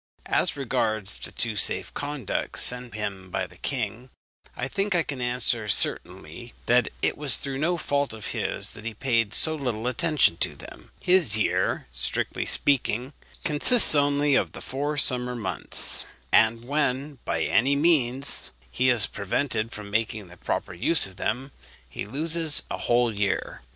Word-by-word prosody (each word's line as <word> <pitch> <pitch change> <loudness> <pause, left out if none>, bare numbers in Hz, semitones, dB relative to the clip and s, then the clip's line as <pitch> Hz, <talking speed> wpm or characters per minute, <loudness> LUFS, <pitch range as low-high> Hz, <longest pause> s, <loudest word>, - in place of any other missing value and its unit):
As - - +1
regards 110 -6 -2
the - - -6
two 115 -2 -1
safe 95 - 0
conducts 145 -6 -2
sent 125 -2 +2
him 100 -3 -4
by 95 +1 -2
the - - -16
king, 125 -1 -4 0.5
I 125 - -2
think 195 +6 -1
I 170 - +2
can 140 -5 -6
answer 120 -2 +1
certainly 100 +2 -1
that 125 +1 +3
it - - +2
was 145 -4 +2
through 135 -1 -4
no 170 +4 0
fault 140 -3 -1
of 110 -1 -5
his - - -1
that 105 - -6
he 115 -1 -5
paid 115 -3 0
so 160 - +7
little 125 -7 -3
attention 145 - +2
to - - -1
them. - - -12
His 180 - +3
year, 110 - 0
strictly - - -2
speaking, 130 -1 +2 0.3
consists 155 +11 +4
only 145 0 +2
of - - +1
the - - -9
four 145 +3 -3
summer 125 -3 -1
months; 105 -6 -1 0.3
and 115 +1 +3
when 140 0 -1
by - - -1
any 135 +5 +2
means 140 -4 +2 0.2
he 130 - +1
is 115 -5 +4
prevented 110 +2 -2
from 105 -1 -8
making 110 -3 -2
the 90 - -15
proper 90 - -4
use 145 - +4
of 95 -1 -10
them, 130 +8 -3 0.4
he - - -7
loses 155 +5 +3
a - - -2
whole 120 -1 +1
year. 100 -1 -2
125 Hz, 160 wpm, -25 LUFS, 110-145 Hz, 0.5 s, so